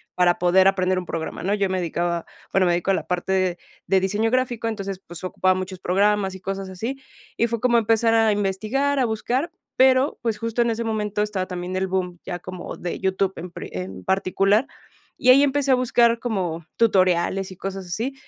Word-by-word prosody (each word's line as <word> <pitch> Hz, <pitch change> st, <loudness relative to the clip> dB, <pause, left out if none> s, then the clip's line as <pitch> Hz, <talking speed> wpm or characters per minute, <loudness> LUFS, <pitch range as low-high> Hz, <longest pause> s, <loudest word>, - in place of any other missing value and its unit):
para 180 Hz, -1 st, +3 dB
poder 185 Hz, +2 st, +5 dB
aprender 185 Hz, -1 st, +2 dB
un 185 Hz, -, -3 dB
programa, 165 Hz, 0 st, -5 dB
¿no? 200 Hz, +2 st, +1 dB
Yo 200 Hz, -2 st, +1 dB
me 185 Hz, -, -1 dB
dedicaba 170 Hz, 0 st, -1 dB, 0.3 s
bueno, 195 Hz, -1 st, +3 dB
me 175 Hz, -, +3 dB
dedico 175 Hz, +2 st, 0 dB
a -, -, +5 dB
la -, -, -3 dB
parte 180 Hz, 0 st, 0 dB, 0.3 s
de 190 Hz, -, +3 dB
diseño 210 Hz, +4 st, 0 dB
gráfico, 245 Hz, -3 st, 0 dB
entonces, 195 Hz, -3 st, -4 dB
pues 175 Hz, +2 st, -10 dB
ocupaba 185 Hz, 0 st, +1 dB
muchos 185 Hz, 0 st, -4 dB
programas 195 Hz, +1 st, +1 dB
y 190 Hz, -, -9 dB
cosas 195 Hz, 0 st, -4 dB
así, 230 Hz, +9 st, -5 dB, 0.4 s
y 235 Hz, -, +2 dB
fue 230 Hz, -1 st, -2 dB
como 240 Hz, -2 st, +4 dB
empezar 225 Hz, 0 st, +3 dB
a 225 Hz, -1 st, +4 dB
investigar, 215 Hz, +8 st, 0 dB
a 260 Hz, -, +3 dB
buscar, 245 Hz, +7 st, -1 dB, 0.2 s
pero, 260 Hz, +2 st, +4 dB
pues 225 Hz, -3 st, -1 dB
justo 230 Hz, +1 st, 0 dB
en 235 Hz, -, 0 dB
ese 230 Hz, +1 st, -2 dB
momento 210 Hz, -2 st, -1 dB
estaba 205 Hz, -3 st, -1 dB
también 180 Hz, 0 st, -5 dB
el 190 Hz, 0 st, 0 dB
boom, 180 Hz, -2 st, -2 dB
ya 175 Hz, -, -4 dB
como 185 Hz, 0 st, -7 dB
de 175 Hz, -, -4 dB
YouTube 190 Hz, 0 st, 0 dB
en 175 Hz, +1 st, -7 dB
pre -, -, -8 dB
en 90 Hz, +1 st, -6 dB
particular. 195 Hz, -, +2 dB, 0.5 s
Y 255 Hz, -, +3 dB
ahí 275 Hz, +2 st, +7 dB
empecé 285 Hz, -1 st, +2 dB
a -, -, +7 dB
buscar 235 Hz, -2 st, +3 dB
como 180 Hz, -9 st, -2 dB
tutoriales 190 Hz, -3 st, +2 dB
y 185 Hz, -, -11 dB
cosas 195 Hz, -1 st, -5 dB
así, 230 Hz, +10 st, -3 dB
195 Hz, 205 wpm, -23 LUFS, 185-230 Hz, 0.5 s, ahí